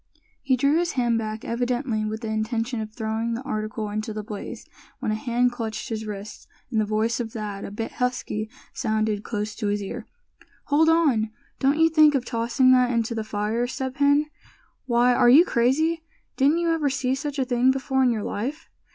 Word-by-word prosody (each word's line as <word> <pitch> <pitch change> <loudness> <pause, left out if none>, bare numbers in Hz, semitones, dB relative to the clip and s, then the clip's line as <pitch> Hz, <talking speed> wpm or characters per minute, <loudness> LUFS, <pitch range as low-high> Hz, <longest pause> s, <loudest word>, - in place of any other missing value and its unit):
He 265 -2 +2
drew 280 +5 +3
his 345 -1 -1
hand 240 -3 +1
back, 215 0 -5
evidently 240 -1 -1
with 215 +1 -4
the 225 - -4
intention 225 +2 -1
of 215 0 -6
throwing 225 +1 -2
the 245 - -5
article 215 -4 -3
into 215 +1 -3
the 215 0 -5
blaze, 210 -2 -7 0.3
when - - -2
a - - +1
hand 240 +3 +1
clutched 225 -2 -5
his 220 -1 -4
wrist, 210 0 -8 0.2
and 220 -3 +2
the - - 0
voice 220 +3 0
of 225 -2 -4
Thad, 205 -3 -5
a - - -6
bit 225 +3 -5
husky, 250 -4 -2 0.2
sounded 215 -3 -1
close 210 -1 -3
to 215 - -2
his 205 0 -1
ear: 235 +3 -6 0.6
"Hold 310 +3 +4
on! 285 -10 +3 0.3
don't 275 +3 +2
you 325 0 +5
think 310 -2 +5
of 255 -2 0
tossing 240 +2 +2
that 250 -1 +5
into 230 -1 0
the 220 -1 -2
fire, 215 +3 -1
Step 260 +1 -4
Hen! 285 +1 +4 0.6
Why, 245 0 +4
are 245 0 +5
you 300 +8 +8
crazy? 310 +7 +1 0.3
Didn't 285 +4 +3
you 340 -1 +1
ever 310 -3 +1
see 260 -1 0
such 280 +1 -4
a 265 - +1
thing 250 0 +2
before 265 0 +1
in 255 - +4
your 220 -3 -1
life. 275 +10 -4
240 Hz, 200 wpm, -24 LUFS, 215-265 Hz, 0.6 s, you